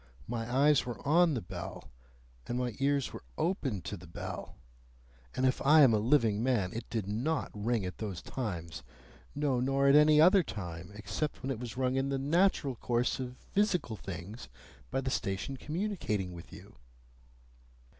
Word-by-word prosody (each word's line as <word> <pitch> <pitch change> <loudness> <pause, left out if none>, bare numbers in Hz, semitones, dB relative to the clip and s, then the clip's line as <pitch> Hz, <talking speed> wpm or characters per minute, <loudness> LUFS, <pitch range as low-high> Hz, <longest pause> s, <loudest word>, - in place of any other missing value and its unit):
My 115 0 -3
eyes 140 +2 +4
were 120 -1 -6
on 165 0 +4
the 115 - -3
bell, 70 -5 -8 0.6
and 120 - -2
my 125 -2 -1
ears 140 -1 +1
were - - -7 0.2
open 135 - -1
to 105 - -4
the 90 -2 -12
bell, 80 - -7 0.8
and 130 - +1
if 130 - +1
I 150 +3 +7
am 125 -4 +6
a 110 - +3
living 110 -3 +3
man, 115 -7 +1
it 115 +1 -6
did 110 -4 -2
NOT 125 +10 -1
ring 110 0 -1
at 90 -1 -6
those 100 -6 -4
times. 85 -8 -5 0.5
No, 140 -3 +1
nor 135 +2 +2
at 140 - +6
any 150 0 +7
other 185 +5 +7
time, 85 - -7
except 110 +8 -4
when 135 - -1
it 120 - -3
was 120 -1 -7
rung 130 0 +1
in 135 +1 0
the 135 - 0
natural 150 0 +2
course 120 +3 0
of 125 -1 -5
physical 195 - 0
things 95 - -8 0.4
by 135 - -1
the 130 0 -2
station 100 +5 -2
communicating 150 - -2
with 85 -1 -11
you." - - -13
125 Hz, 175 wpm, -31 LUFS, 105-145 Hz, 0.8 s, I